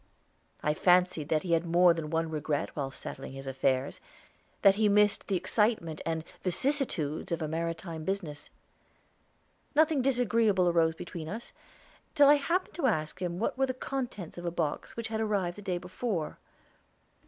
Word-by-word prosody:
I 150 Hz, -, +2 dB
fancied 180 Hz, -2 st, +3 dB
that 155 Hz, -1 st, +1 dB
he 180 Hz, -, -3 dB
had 165 Hz, 0 st, +3 dB
more 175 Hz, +1 st, +5 dB
than 160 Hz, -2 st, -5 dB
one 165 Hz, 0 st, -1 dB
regret 150 Hz, -1 st, -2 dB
while 140 Hz, -3 st, -2 dB
settling 135 Hz, 0 st, -8 dB
his 135 Hz, 0 st, -8 dB
affairs; 135 Hz, 0 st, 0 dB, 0.6 s
that 195 Hz, -1 st, +8 dB
he 210 Hz, +1 st, +2 dB
missed 210 Hz, +1 st, +3 dB
the 195 Hz, -, 0 dB
excitement 185 Hz, -5 st, 0 dB
and 160 Hz, -1 st, -1 dB, 0.2 s
vicissitudes 185 Hz, -, +1 dB
of 170 Hz, -, 0 dB
a 155 Hz, -, -2 dB
maritime 165 Hz, 0 st, -4 dB
business. 160 Hz, -5 st, -4 dB, 1.3 s
Nothing 310 Hz, -2 st, +4 dB
disagreeable 230 Hz, -7 st, +2 dB
arose 165 Hz, -2 st, +3 dB
between 165 Hz, -2 st, -7 dB
us, 225 Hz, +5 st, -7 dB, 0.6 s
till 290 Hz, -2 st, +7 dB
I 295 Hz, -, +7 dB
happened 340 Hz, +6 st, -1 dB
to 300 Hz, -6 st, +2 dB
ask 155 Hz, -4 st, -1 dB
him 175 Hz, -1 st, -2 dB
what 230 Hz, +6 st, -2 dB
were 270 Hz, -, +3 dB
the 255 Hz, -, -3 dB
contents 245 Hz, -11 st, -5 dB
of 175 Hz, -, -7 dB
a -, -, +1 dB
box 165 Hz, +2 st, -3 dB
which 230 Hz, -1 st, -3 dB
had 220 Hz, 0 st, -2 dB
arrived 200 Hz, -5 st, 0 dB
the 205 Hz, -, -10 dB
day 185 Hz, -3 st, -2 dB
before. 180 Hz, -1 st, -4 dB
175 Hz, 165 wpm, -30 LUFS, 160-220 Hz, 1.3 s, that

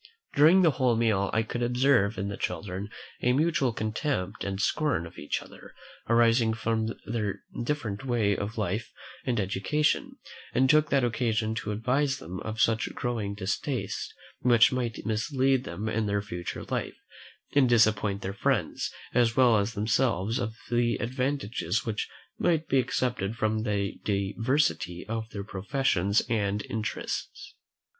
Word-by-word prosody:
During 165 Hz, +6 st, +6 dB
the 165 Hz, -, +6 dB
whole 125 Hz, -3 st, +2 dB
meal, 110 Hz, -4 st, +2 dB
I 110 Hz, -, +2 dB
could 120 Hz, +2 st, -4 dB
observe 120 Hz, -3 st, +3 dB
in 100 Hz, -, -2 dB
the 100 Hz, -, -3 dB
children 95 Hz, +3 st, -4 dB, 0.3 s
a 125 Hz, -, +3 dB
mutual 150 Hz, -3 st, +2 dB
contempt 110 Hz, -, -2 dB
and 95 Hz, -1 st, -3 dB
scorn 125 Hz, -, +1 dB
of 85 Hz, -, -11 dB
each 75 Hz, -, -2 dB
other, -, -, -14 dB, 0.3 s
arising 115 Hz, -1 st, +4 dB
from 110 Hz, 0 st, -1 dB
their 105 Hz, -3 st, -3 dB, 0.2 s
different 120 Hz, -7 st, -2 dB
way 115 Hz, -6 st, +1 dB
of 100 Hz, +4 st, -4 dB
life 105 Hz, +2 st, -2 dB, 0.4 s
and 120 Hz, -3 st, +1 dB
education, 105 Hz, +10 st, 0 dB, 0.4 s
and 130 Hz, -, +4 dB
took 155 Hz, +2 st, +4 dB
that 140 Hz, -2 st, +3 dB
occasion 110 Hz, -2 st, 0 dB
to 110 Hz, -2 st, -3 dB
advertise 130 Hz, +6 st, +1 dB
them 90 Hz, -3 st, -7 dB
of 110 Hz, 0 st, -5 dB
such 115 Hz, 0 st, +2 dB
growing 110 Hz, -5 st, -2 dB
distastes, 100 Hz, -1 st, -3 dB, 0.3 s
which 120 Hz, -2 st, +5 dB
might 120 Hz, -5 st, -3 dB
mislead 130 Hz, +4 st, +1 dB
them 100 Hz, +6 st, -4 dB
in 110 Hz, -1 st, 0 dB
their 100 Hz, 0 st, 0 dB
future 90 Hz, -3 st, -5 dB
life, -, -, -3 dB, 0.6 s
and 140 Hz, -3 st, +4 dB
disappoint 105 Hz, -3 st, +3 dB
their 95 Hz, -, -3 dB
friends, 105 Hz, -, 0 dB, 0.2 s
as 120 Hz, -2 st, +3 dB
well 125 Hz, -4 st, +5 dB
as 105 Hz, +3 st, -2 dB
themselves, 110 Hz, 0 st, +1 dB
of 110 Hz, 0 st, -3 dB, 0.2 s
the 120 Hz, 0 st, +2 dB
advantages 125 Hz, -2 st, -1 dB
which 110 Hz, -2 st, -2 dB, 0.3 s
might 165 Hz, -2 st, +1 dB
be 135 Hz, -, +3 dB
expected 120 Hz, -4 st, -1 dB
from 110 Hz, -1 st, 0 dB
the 100 Hz, -3 st, -2 dB
diversity 100 Hz, -, 0 dB
of 110 Hz, 0 st, -3 dB
their 100 Hz, -2 st, -5 dB
professions 100 Hz, -1 st, +1 dB
and 105 Hz, -2 st, 0 dB
interests. 115 Hz, -, -4 dB
110 Hz, 150 wpm, -28 LUFS, 100-125 Hz, 0.6 s, During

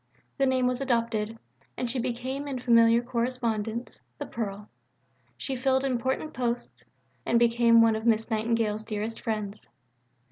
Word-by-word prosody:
The 270 Hz, -, +4 dB
name 260 Hz, -1 st, +2 dB
was 250 Hz, +1 st, 0 dB
adopted, 230 Hz, -4 st, 0 dB, 0.4 s
and 250 Hz, -, -1 dB
she 250 Hz, +2 st, -1 dB
became 255 Hz, +3 st, -3 dB
in 270 Hz, -2 st, -3 dB
familiar 235 Hz, -1 st, +5 dB
correspondence 235 Hz, -2 st, -2 dB, 0.2 s
"The -, -, -5 dB
Pearl." 210 Hz, -2 st, -5 dB, 0.7 s
She 265 Hz, -, -3 dB
filled 265 Hz, +1 st, +1 dB
important 260 Hz, +3 st, -1 dB
posts, 240 Hz, -1 st, -3 dB, 0.4 s
and 235 Hz, -, +2 dB
became 235 Hz, -1 st, +5 dB
one 225 Hz, -1 st, +4 dB
of 220 Hz, +2 st, -3 dB
Miss 225 Hz, 0 st, +2 dB
Nightingale's 220 Hz, -1 st, 0 dB
dearest 220 Hz, +1 st, -4 dB
friends. 215 Hz, -2 st, -4 dB
235 Hz, 140 wpm, -27 LUFS, 220-250 Hz, 0.7 s, familiar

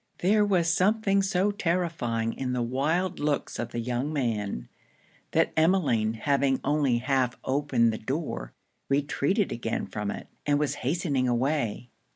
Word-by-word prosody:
There 210 Hz, +4 st, +3 dB
was 185 Hz, -5 st, +2 dB
something 200 Hz, +3 st, +3 dB
so 190 Hz, +1 st, +1 dB
terrifying 165 Hz, -, -1 dB
in 130 Hz, -1 st, -3 dB
the 125 Hz, -1 st, 0 dB
wild 160 Hz, +9 st, 0 dB
looks 145 Hz, -1 st, -1 dB
of 120 Hz, -, -2 dB
the 120 Hz, -, -6 dB
young 125 Hz, +5 st, -2 dB
man, 105 Hz, -, -2 dB, 0.6 s
that -, -, +2 dB
Emmeline 155 Hz, -, +2 dB
having 135 Hz, +2 st, +1 dB
only 140 Hz, -4 st, +2 dB
half 125 Hz, 0 st, 0 dB
opened 130 Hz, -4 st, +2 dB
the 110 Hz, -, -5 dB
door, 130 Hz, -, -3 dB, 0.4 s
retreated 145 Hz, +8 st, +1 dB
again 115 Hz, -1 st, -2 dB
from 105 Hz, -1 st, -4 dB
it, -, -, -5 dB, 0.2 s
and 145 Hz, -1 st, +2 dB
was 150 Hz, -1 st, 0 dB
hastening 140 Hz, -2 st, 0 dB
away. 125 Hz, -2 st, -1 dB
140 Hz, 145 wpm, -27 LUFS, 120-170 Hz, 0.6 s, There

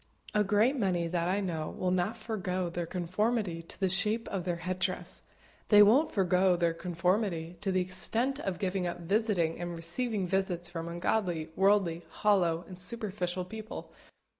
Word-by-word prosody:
A 210 Hz, -, +3 dB
great 210 Hz, +7 st, +3 dB
many 185 Hz, -8 st, 0 dB
that 170 Hz, 0 st, 0 dB
I 195 Hz, +2 st, +1 dB
know 160 Hz, -5 st, -2 dB
will 185 Hz, -1 st, -2 dB
not 185 Hz, +5 st, 0 dB
forego 185 Hz, -5 st, -2 dB
their 170 Hz, 0 st, -3 dB
conformity 185 Hz, +1 st, -1 dB
to 165 Hz, -, -6 dB
the 190 Hz, -, +2 dB
shape 210 Hz, +5 st, 0 dB
of 185 Hz, -3 st, -3 dB
their 175 Hz, -2 st, 0 dB
head 180 Hz, +2 st, -4 dB
dress. 185 Hz, 0 st, -2 dB, 0.5 s
They 210 Hz, -1 st, +8 dB
won't 255 Hz, +10 st, +5 dB
forego 185 Hz, -1 st, +3 dB
their 170 Hz, -1 st, +1 dB
conformity 175 Hz, 0 st, -1 dB
to 200 Hz, -2 st, 0 dB
the 185 Hz, 0 st, +2 dB
extent 225 Hz, +9 st, 0 dB
of 195 Hz, -, -3 dB
giving 185 Hz, -1 st, -1 dB
up 175 Hz, 0 st, -5 dB
visiting 185 Hz, -3 st, +1 dB
and 175 Hz, 0 st, -4 dB
receiving 190 Hz, +4 st, -1 dB
visits 180 Hz, -2 st, 0 dB
from 165 Hz, -1 st, -5 dB
ungodly, 175 Hz, -1 st, -1 dB
worldly, 190 Hz, -4 st, +3 dB
hollow, 175 Hz, -3 st, +2 dB
and 185 Hz, -1 st, -9 dB
superficial 185 Hz, -3 st, -2 dB
people. 220 Hz, +3 st, -8 dB
185 Hz, 165 wpm, -30 LUFS, 175-210 Hz, 0.5 s, They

